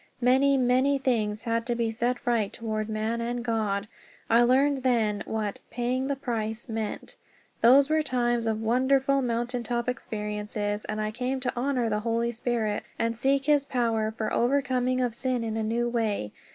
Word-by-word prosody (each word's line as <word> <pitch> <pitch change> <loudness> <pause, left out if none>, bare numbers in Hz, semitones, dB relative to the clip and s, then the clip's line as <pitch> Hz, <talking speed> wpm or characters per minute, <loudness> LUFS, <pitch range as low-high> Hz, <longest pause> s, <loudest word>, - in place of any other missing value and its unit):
Many, 265 +3 +4
many 260 +2 +3
things 220 -5 0
had 230 0 0
to 240 - 0
be 230 -1 0
set 240 +2 -2
right 230 -4 +1
toward 215 -1 -3
man 220 +2 -1
and 240 +1 -3
God. 210 -3 -1 0.4
I 230 +1 +6
learned 265 +3 +3
then 225 -5 +1
what 215 -2 -3
"paying 250 +2 -1
the 280 - 0
price" 230 -4 -3
meant. 220 -2 -4 0.5
Those 270 +4 +7
were 310 +1 +2
times 240 -4 0
of 220 0 -1
wonderful 265 +4 +2
mountain 240 0 -1
top 235 +1 -2
experiences, 210 -3 -3
and 215 0 -3
I 215 0 -1
came 250 +3 -2
to 250 - -1
honor 250 -1 0
the 210 -1 0
Holy 230 +1 0
Spirit 225 -3 -1 0.2
and 230 0 0
seek 270 +3 +1
his 295 -1 +4
power 230 -5 0
for 220 - -1
the - - -6
overcoming 255 0 +1
of 245 -2 0
sin 250 0 -1
in 220 -1 -3
a 225 - -1
new 230 +2 0
way. 220 - -1
235 Hz, 180 wpm, -27 LUFS, 220-255 Hz, 0.5 s, Those